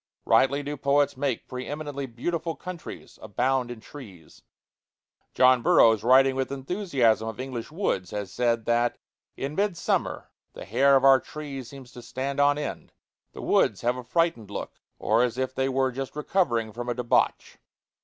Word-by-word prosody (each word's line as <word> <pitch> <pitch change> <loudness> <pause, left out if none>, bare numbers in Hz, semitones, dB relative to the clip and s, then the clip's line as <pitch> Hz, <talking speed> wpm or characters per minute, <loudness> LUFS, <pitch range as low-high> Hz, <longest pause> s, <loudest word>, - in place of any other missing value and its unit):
Rightly 140 +2 +3
do 145 +1 -5
poets 140 +1 +2
make 135 -2 -2
pre 125 0 -6
eminently 145 -2 -5
beautiful 165 +7 -3
countries 180 -2 -9
abound 125 +4 0
in 120 -2 -7
trees. 105 - -13 0.9
John 130 -1 +5
Burroughs, 110 -2 +5
writing 130 +2 +5
with 135 0 -2
enthusiasm 135 - 0
of 110 +1 -6
English 130 -1 -5
woods, 155 - -2
has 100 -2 -5
said 115 -2 0
that 120 0 +1 0.4
"in 140 +2 -4
midsummer 195 -1 -1 0.2
the - - -9
hair 135 +6 +4
of 135 - +3
our 135 -1 +7
trees 140 -4 -8
seems 135 -3 -12
to 120 - -11
stand 135 +4 -4
on 145 0 +4
end; 150 - -6 0.4
the - - -8
woods - - +2
have 120 +1 +1
a 125 - -7
frightened 165 - 0
look, 100 - -7 0.2
or 110 +3 +2
as 125 -1 0
if 130 0 -2
they 135 0 0
were 130 0 +1
just 135 +2 -6
recovering 120 - 0
from 120 +2 -5
a 120 - -1
debauch." 125 -1 0
130 Hz, 165 wpm, -26 LUFS, 120-145 Hz, 0.9 s, our